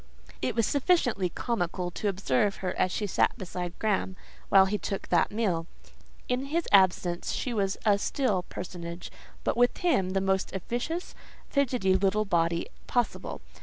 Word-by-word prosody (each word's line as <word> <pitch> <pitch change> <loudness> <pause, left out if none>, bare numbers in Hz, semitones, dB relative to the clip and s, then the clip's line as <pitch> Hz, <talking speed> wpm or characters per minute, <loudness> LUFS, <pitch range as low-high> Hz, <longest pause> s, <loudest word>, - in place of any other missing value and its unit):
It 130 - -1
was 230 -2 +3
sufficiently 255 - +2
comical 180 -4 -2
to 210 - -3
observe 195 0 +1
her 180 -1 -3
as 185 - +1
she 210 - -1
sat 200 - +1
beside 180 -1 -5
Graham, 195 -3 0 0.3
while 195 -1 +7
he 205 +2 -1
took 195 - -4
that 175 -2 +3
meal. 190 -7 0 0.6
In 250 +2 0
his 325 +4 -1
absence 180 -3 +3
she 250 - -2
was 195 -3 0
a 205 -2 +4
still 215 -6 0
personage, 175 -1 -7 0.3
but - - 0
with 245 +1 +3
him 195 - +1
the 195 - +2
most 190 0 0
officious, 245 - -3 0.4
fidgety 250 -9 +2
little 200 +3 +2
body 170 -3 +1 0.2
possible. 245 -2 -1
195 Hz, 155 wpm, -28 LUFS, 180-235 Hz, 0.6 s, while